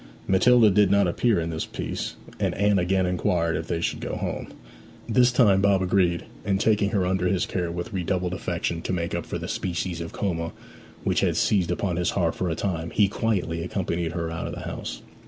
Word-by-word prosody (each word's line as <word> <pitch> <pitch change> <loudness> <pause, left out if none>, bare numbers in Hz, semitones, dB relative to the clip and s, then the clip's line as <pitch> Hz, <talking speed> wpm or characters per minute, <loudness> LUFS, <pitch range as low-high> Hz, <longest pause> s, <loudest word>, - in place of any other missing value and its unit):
Matilda 110 +3 +5
did 105 +1 +4
not 100 -1 +4
appear 105 +3 +2
in 85 0 -2
this 80 - -3
piece, - - -4 0.2
and - - 0
Anne 100 -1 +3
again 95 +1 +2
inquired 85 -2 +1
if 80 +1 -3
they 85 -1 -1
should - - -1
go - - -4
home. - - -4 0.6
This 125 +2 +4
time 105 -6 +4
Bob 100 -2 +3
agreed, 90 -2 +2 0.2
and 95 -1 0
taking 105 -1 +2
her 100 -4 +1
under 90 0 +1
his 90 0 +1
care 90 -2 -2
with 85 +3 -5
redoubled 90 -1 -1
affection, 85 -2 -2
to 95 - -3
make 85 -1 -2
up - - -3
for - - -3
the - - -5
species 85 -1 -3
of 85 - -6
coma 85 -5 -2 0.5
which - - +1
had - - +1
seized 95 -5 +2
upon 90 0 -1
his 90 - +1
heart 85 -4 +1
for 90 - -2
a 80 - -1
time, 85 -2 -2
he 105 +3 +3
quietly 95 -6 -1
accompanied 85 -3 -2
her 85 -1 -3
out 85 - -4
of - - -5
the - - -7
house. - - -6
90 Hz, 210 wpm, -25 LUFS, 85-100 Hz, 0.6 s, Matilda